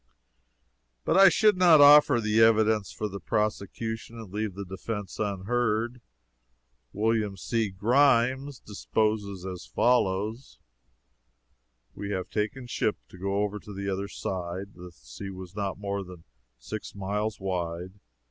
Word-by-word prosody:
But -, -, +2 dB
I 195 Hz, 0 st, +9 dB
should 210 Hz, +3 st, +4 dB
not 175 Hz, -4 st, +7 dB
offer 145 Hz, -3 st, +8 dB
the 110 Hz, 0 st, +1 dB
evidence 110 Hz, -2 st, +4 dB
for 105 Hz, -, -4 dB
the 100 Hz, -1 st, -7 dB
prosecution 110 Hz, +4 st, -3 dB
and 110 Hz, -4 st, -10 dB
leave 105 Hz, -2 st, -3 dB
the 100 Hz, 0 st, -6 dB
defense 95 Hz, +1 st, -6 dB
unheard. 110 Hz, +3 st, -1 dB, 0.9 s
Wm. 105 Hz, -1 st, 0 dB
C. 115 Hz, +2 st, -1 dB
Grimes 130 Hz, +5 st, +2 dB
deposes 105 Hz, -2 st, -2 dB
as 90 Hz, -1 st, -7 dB
follows: 110 Hz, 0 st, 0 dB, 1.4 s
"We 100 Hz, -, -6 dB
had 95 Hz, -3 st, -3 dB
taken 110 Hz, +5 st, -2 dB
ship 115 Hz, -3 st, -1 dB
to -, -, -13 dB
go 100 Hz, +2 st, 0 dB
over 105 Hz, 0 st, -3 dB
to 105 Hz, -, -12 dB
the 100 Hz, 0 st, -3 dB
other 100 Hz, +1 st, -2 dB
side. 95 Hz, +1 st, -5 dB
The 90 Hz, 0 st, -11 dB
sea 95 Hz, +4 st, -10 dB
was 95 Hz, 0 st, -9 dB
not 100 Hz, -2 st, -3 dB
more 100 Hz, 0 st, -3 dB
than 90 Hz, -3 st, -12 dB, 0.3 s
six 105 Hz, -, -7 dB
miles 105 Hz, +2 st, -2 dB
wide. 90 Hz, 0 st, -4 dB
105 Hz, 135 wpm, -27 LUFS, 95-115 Hz, 1.4 s, I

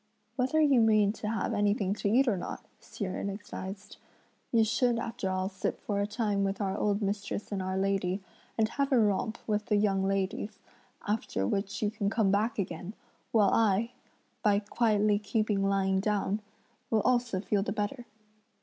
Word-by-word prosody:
"Whether 265 Hz, +4 st, +1 dB
you 280 Hz, -5 st, +5 dB
mean 215 Hz, -2 st, +4 dB
to 210 Hz, -1 st, -4 dB
have 225 Hz, +1 st, -1 dB
anything 205 Hz, -2 st, +1 dB
to 200 Hz, -, 0 dB
eat 255 Hz, +5 st, +4 dB
or 225 Hz, -, +3 dB
not," 180 Hz, -, -6 dB
Hsi 205 Hz, -, -6 dB
Jen 185 Hz, +2 st, -3 dB
advised, 200 Hz, 0 st, -7 dB, 0.5 s
"you 230 Hz, -2 st, +5 dB
should 240 Hz, +2 st, +2 dB
after 230 Hz, -4 st, -3 dB
all 185 Hz, 0 st, 0 dB
sit 190 Hz, -1 st, -3 dB
for 205 Hz, -1 st, -2 dB
a 200 Hz, -, 0 dB
time 210 Hz, -2 st, 0 dB
with 195 Hz, 0 st, -1 dB
our 195 Hz, -2 st, -1 dB
old 205 Hz, 0 st, 0 dB
mistress 205 Hz, +1 st, -3 dB
and 200 Hz, -2 st, -1 dB
our 185 Hz, 0 st, -2 dB
lady, 195 Hz, -1 st, 0 dB, 0.4 s
and 220 Hz, -1 st, +3 dB
have 280 Hz, +4 st, -1 dB
a 260 Hz, -, +5 dB
romp 215 Hz, +1 st, +1 dB
with 210 Hz, -1 st, -1 dB
the 210 Hz, -, +2 dB
young 200 Hz, -2 st, +2 dB
ladies; 195 Hz, +2 st, -1 dB, 0.5 s
after 205 Hz, -, -1 dB
which 195 Hz, -, -2 dB
you 210 Hz, -, +1 dB
can 205 Hz, -2 st, -1 dB
come 215 Hz, -3 st, +2 dB
back 210 Hz, +4 st, +1 dB
again; 185 Hz, +1 st, -4 dB, 0.4 s
while 210 Hz, -4 st, +4 dB
I, 225 Hz, +1 st, +2 dB, 0.5 s
by 205 Hz, -2 st, +4 dB
quietly 210 Hz, -1 st, +2 dB
keeping 210 Hz, -1 st, 0 dB
lying 195 Hz, -1 st, +2 dB
down, 205 Hz, 0 st, 0 dB, 0.5 s
will 220 Hz, -2 st, +3 dB
also 240 Hz, -5 st, +1 dB
feel 205 Hz, +1 st, 0 dB
the 195 Hz, -, -2 dB
better." 215 Hz, +4 st, -3 dB
205 Hz, 175 wpm, -30 LUFS, 195-220 Hz, 0.5 s, you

